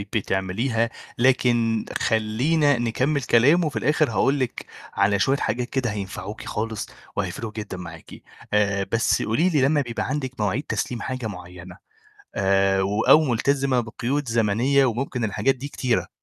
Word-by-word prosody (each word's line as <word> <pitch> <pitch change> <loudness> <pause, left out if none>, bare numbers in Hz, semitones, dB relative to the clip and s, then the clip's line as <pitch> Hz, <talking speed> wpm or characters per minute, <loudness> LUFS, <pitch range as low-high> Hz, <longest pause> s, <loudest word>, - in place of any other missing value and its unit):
بتعمليها، 110 +4 0 0.3
لكن 120 -3 +2
خلّينا 125 +7 +2
نكمّل 130 +5 0
كلام، 140 +9 +4
وفي 150 -3 -2
الآخر 150 +2 +2
هاقول 140 +1 +2
لِك 130 -2 -3 0.3
على 100 0 +2
شوية 135 +8 +2
حاجات 120 +2 -2
كده 130 -4 -1
هينفعوكِ 100 0 -6
خالص، 110 0 -3 0.3
وهيفرقوا 115 -2 -3
جدًا 105 -4 -5
معاكِ. 80 -2 -10 0.4
آآ، 100 -1 +1
بس 115 +1 +2
قولي 145 +12 +2
لي 150 -6 +2
لمّا 145 +2 +3
بيبقى 120 -3 -3
عندِك 130 -3 -4
مواعيد 105 +7 0
تسليم 120 -5 -3
حاجة 130 -3 -4
معيّنة، 90 -1 -10 0.6
آآ، 95 0 +2
و 100 +3 0
أو 155 +6 +6
ملتزمة 135 +1 +1
بقيود 125 +4 -2
زمنية، 120 +5 +2
وممكن 125 0 -2
الحاجات 130 +6 +1
دي 135 +3 -7
كتيرة، 125 -4 -1
115 Hz, 145 wpm, -23 LUFS, 105-135 Hz, 0.6 s, أو